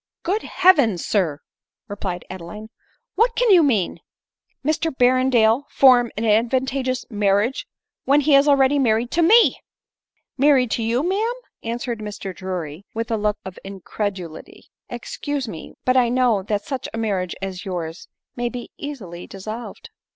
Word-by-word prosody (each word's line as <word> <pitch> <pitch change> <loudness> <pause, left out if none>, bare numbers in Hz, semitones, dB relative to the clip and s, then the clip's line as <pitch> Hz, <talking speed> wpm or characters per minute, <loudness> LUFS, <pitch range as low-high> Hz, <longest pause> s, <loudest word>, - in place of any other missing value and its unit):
" - - -69
Good 405 +5 0
heavens! 285 - +3
sir," 165 -8 0 0.5
replied 195 -4 -5
Adeline; 190 +5 -9 0.2
" - - -46
What 465 +3 +3
can 485 -3 +3
you 360 -3 +7
mean? 225 - +1 0.7
Mr 315 +2 +1
Berrendale 255 -1 +3
form 245 -3 +5
an 225 - -1
advantageous 255 +4 +1
mar 205 -2 +2
riage 225 +6 -1 0.4
when 285 +2 +4
he 290 +1 +2
is 275 +1 +6
already 280 0 +4
married 235 -1 +1
to 340 - +1
me 440 +8 +5 0.2
?" - - -70
" - - -51
Married 265 -4 +4
to - - 0
you, 235 +8 0
ma'am 435 +6 0 0.2
!" - - -44
answered 235 -1 -4
Mr 205 -3 -6
Drury 180 -3 -5
with 230 +1 -3
a - - +2
look 210 -1 0
of 190 -1 -8
incredulity. 195 -3 -6
" - - -57
Excuse 280 +2 -4
me, 170 -7 -9
but 255 - +3
I 250 -2 +4
know 245 -4 +2
that 205 +1 -3
such 270 -3 -4
marriages 200 -6 -2
as 190 -2 -5
yours 170 -3 -5 0.3
may 240 -1 -2
be 245 0 -8
easily 195 -13 -7
dissolved." 215 +5 -8
230 Hz, 165 wpm, -22 LUFS, 200-270 Hz, 0.7 s, you